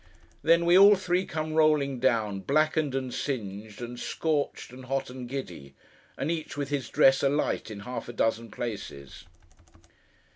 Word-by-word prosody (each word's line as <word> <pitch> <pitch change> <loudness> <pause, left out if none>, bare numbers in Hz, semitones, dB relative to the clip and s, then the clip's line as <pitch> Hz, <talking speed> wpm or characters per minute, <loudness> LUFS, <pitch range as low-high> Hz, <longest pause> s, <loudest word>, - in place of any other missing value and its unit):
Then, 170 +2 +4
we 175 +1 +5
all 200 +2 +9
three 185 0 -1
come 155 0 -3
rolling 150 -4 +3
down; 110 -6 +1
blackened, 155 +3 +1
and 130 -2 -3
singed, 105 -4 -5
and 120 0 -7
scorched, 150 -5 -2
and 130 0 -11
hot, 135 0 -2
and 125 -1 -8
giddy: 90 - -7 0.4
and 150 - -1
each 160 -3 -4
with 140 -2 -3
his 140 -4 -2
dress 135 0 +5
alight 140 -4 0
in 105 -2 -7
half 120 +1 -6
a - - -6
dozen 115 0 0
places. 100 - -7
135 Hz, 155 wpm, -28 LUFS, 115-155 Hz, 0.4 s, all